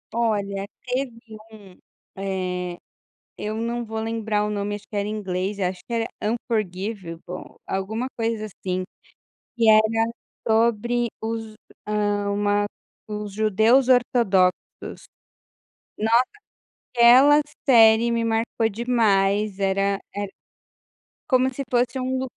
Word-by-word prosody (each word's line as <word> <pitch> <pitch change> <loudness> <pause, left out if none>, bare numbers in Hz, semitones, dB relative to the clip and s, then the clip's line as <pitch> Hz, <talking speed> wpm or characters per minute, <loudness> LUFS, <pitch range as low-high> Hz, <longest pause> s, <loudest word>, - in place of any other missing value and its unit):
Olha, 200 -4 0 0.2
teve 255 +1 -1 0.4
um, 200 -4 -14 0.4
eh, 185 -2 -3 0.6
eu 215 +1 -3
não 235 +1 -2
vou 220 0 -4
lembrar 220 -2 -1
o 210 - -2
nome, 205 0 -2
acho 205 0 -8
que 210 - -6
era 200 0 0
inglês, 200 -1 -3
eu 185 - +2
acho 180 0 -4
que 235 - -8
era 230 0 0
Unforgivable, 195 -5 -4
alguma 220 +6 -2
coisa 225 -1 -1
assim. 185 -2 -4 0.7
Que 225 -2 +5
era 225 +1 +4 0.4
sobre 235 +1 +2 0.2
os, 225 -1 -4
h - - -20 0.4
hã, 205 -1 0
uma 205 0 +1 0.4
os 210 -1 -5
judeus 220 +5 +3
ortodoxos. 230 -7 +3 1.4
Nossa, 230 +4 +3 0.7
aquela 255 +5 +7 0.3
série 230 -2 +6
me 230 0 0
marcou 225 0 0
demais 210 -3 +1
era 195 0 +1 0.2
era 205 0 -3 1.0
como 260 -2 +3
se 275 +2 -5
fosse 245 +1 +1
um 260 +1 -1
215 Hz, 120 wpm, -23 LUFS, 200-235 Hz, 1.4 s, aquela